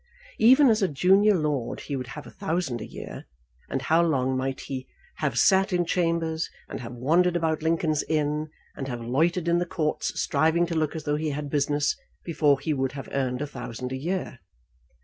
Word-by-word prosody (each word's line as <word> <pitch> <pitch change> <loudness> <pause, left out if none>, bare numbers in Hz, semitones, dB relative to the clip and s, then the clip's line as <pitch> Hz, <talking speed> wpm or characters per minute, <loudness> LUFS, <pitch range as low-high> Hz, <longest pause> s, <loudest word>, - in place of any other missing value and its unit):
Even 260 +5 +7
as 220 -2 +3
a 195 - +3
junior 195 +8 +4
lord 150 -7 -1
he 145 - -4
would 130 -2 -4
have 145 +4 -8
a - - -11
thousand 165 - -2
a - - -6
year; - - -8 0.4
and 135 - -2
how 160 +3 +4
long 130 -6 +1
might 130 0 -2
he 130 -1 -6 0.3
have 140 -6 -1
sat 195 +6 +4
in 175 -1 +1
chambers, 165 -2 0 0.2
and - - -6
have 120 -1 -7
wandered 165 +9 +2
about 160 -2 0
Lincoln's 160 -1 +1
Inn, 150 0 0 0.3
and 135 - -5
have 120 -3 -5
loitered 165 +8 +1
in 170 0 +3
the 175 - 0
courts 155 -3 -2
striving 160 +4 +2
to 170 - -4
look 155 0 0
as 160 - -5
though 145 0 0
he 155 0 -1
had 145 0 -4
business, 145 0 +1 0.3
before 150 -4 +2
he 150 +3 -1
would 135 -2 -1
have 140 -1 -7
earned 130 0 -1
a - - -1
thousand 125 -2 -6
a - - -2
year! 170 0 -3
150 Hz, 200 wpm, -26 LUFS, 135-170 Hz, 0.4 s, Even